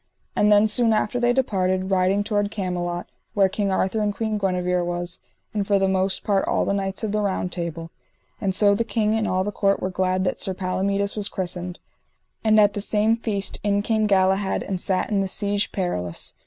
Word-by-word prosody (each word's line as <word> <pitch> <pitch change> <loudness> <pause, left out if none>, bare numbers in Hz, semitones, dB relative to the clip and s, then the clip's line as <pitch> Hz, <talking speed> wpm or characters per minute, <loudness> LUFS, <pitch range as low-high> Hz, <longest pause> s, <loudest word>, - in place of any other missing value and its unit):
And 210 0 +3
then 210 +1 +6
soon 230 0 +3
after 215 +3 0
they 240 0 +3
departed, 190 -7 0
riding 190 +2 +2
toward 205 -1 0
Camelot, 175 -3 -3 0.3
where 195 -2 +5
King 200 +1 -1
Arthur 190 +3 0
and 210 -1 +1
Queen 220 -2 -2
Guenever 180 -2 0
was, 175 0 -4 0.3
and 205 -2 -1
for 200 - +3
the 195 0 +2
most 190 0 0
part 200 -2 +1
all - - +1
the - - 0
knights 195 +1 -2
of 215 - -1
the 210 0 0
Round 190 -3 -1
Table. 165 -1 -5 0.5
And 190 -2 0
so 205 0 +4
the 220 +3 +1
king 220 -2 0
and 220 -1 0
all 185 0 +1
the 205 - -3
court 200 -1 +1
were 185 - -3
glad 185 0 0
that 185 - -1
Sir 190 - -1
Palomides 200 +2 -1
was 205 -2 -3
christened. 180 -1 -4 0.6
And 215 -1 +5
at 205 -1 +5
the 205 - -3
same 215 +2 +3
feast 210 -4 -2
in 205 0 +1
came 215 -1 +1
Galahad 190 0 +2
and 190 -2 -3
sat 190 +3 +1
in 200 -2 +2
the 195 - -1
Siege 205 +1 -1
Perilous. 90 - -3
195 Hz, 210 wpm, -23 LUFS, 185-210 Hz, 0.6 s, then